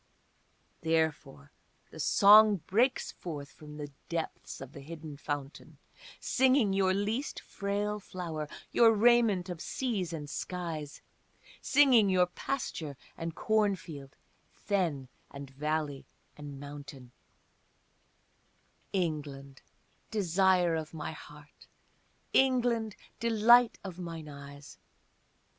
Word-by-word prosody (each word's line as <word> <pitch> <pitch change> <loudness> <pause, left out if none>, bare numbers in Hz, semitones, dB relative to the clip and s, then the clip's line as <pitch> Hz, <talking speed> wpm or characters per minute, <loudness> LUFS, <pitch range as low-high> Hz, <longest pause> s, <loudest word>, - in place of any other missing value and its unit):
Therefore 160 - -1 0.4
the - - -11
song 210 +1 +7
breaks 250 +7 +1
forth 145 -5 -7
from 150 -1 -12
the 145 -1 -7 0.2
depths 165 -1 -4
of 135 -1 -9
the - - -9
hidden 155 0 -9
fountain 140 0 -6 0.4
Singing 255 -5 +3
your 190 -1 +2
least 210 +8 -2
frail 205 +1 -3
flower, 165 -6 -5 0.2
your 230 -1 +6
raiment 220 -4 +4
of 175 -3 -6
seas 215 -10 -2
and 150 -3 -5
skies, 160 -2 -5 0.6
Singing 260 -8 +5
your 185 -1 +4
pasture 175 - -4 0.2
and 165 -1 -5
cornfield, 190 -10 -1 0.3
fen 170 -10 -2 0.2
and 140 -1 -9
valley 150 0 -3 0.3
and 145 -2 -9
mountain, 140 -3 -10 1.8
England, 145 -6 -3 0.5
desire 185 -3 +2
of 160 0 -4
my 155 - -4
heart, 150 -1 -14 0.7
England, 245 -5 +2 0.2
delight 235 +1 +5
of 185 -2 -8
mine 165 -3 -6
eyes! 140 0 -11
170 Hz, 100 wpm, -30 LUFS, 150-210 Hz, 1.8 s, song